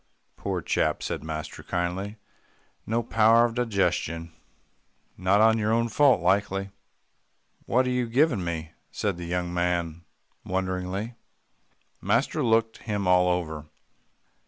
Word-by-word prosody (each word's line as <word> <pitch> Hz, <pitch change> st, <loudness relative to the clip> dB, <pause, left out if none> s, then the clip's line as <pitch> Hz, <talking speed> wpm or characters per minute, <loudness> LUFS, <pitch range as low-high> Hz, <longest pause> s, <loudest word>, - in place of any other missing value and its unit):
"Poor -, -, -3 dB
chap," -, -, 0 dB
said -, -, -3 dB
master 80 Hz, -1 st, -6 dB
kindly, 95 Hz, +4 st, -3 dB, 0.7 s
"no 115 Hz, +2 st, 0 dB
power 115 Hz, +1 st, +5 dB
of 120 Hz, -, -2 dB
digestion. 90 Hz, -8 st, -1 dB, 0.8 s
Not 105 Hz, +5 st, +4 dB
your 110 Hz, 0 st, 0 dB
own 115 Hz, +1 st, +2 dB
fault, 135 Hz, -4 st, +4 dB
likely." 95 Hz, +1 st, +1 dB, 1.0 s
"What 130 Hz, +2 st, +3 dB
are 125 Hz, -, 0 dB
you 125 Hz, -1 st, 0 dB
givin' 125 Hz, -, +2 dB
me," 80 Hz, -2 st, -4 dB, 0.2 s
said 100 Hz, -4 st, -2 dB
the 85 Hz, -, -6 dB
young 90 Hz, 0 st, -2 dB
man 85 Hz, -1 st, -1 dB, 0.4 s
wonderingly. 95 Hz, +4 st, -3 dB, 0.9 s
Master -, -, +1 dB
looked 115 Hz, 0 st, +2 dB
him 105 Hz, -4 st, -3 dB
all 90 Hz, 0 st, +5 dB
over. 80 Hz, -4 st, -2 dB
95 Hz, 120 wpm, -26 LUFS, 90-115 Hz, 1.0 s, power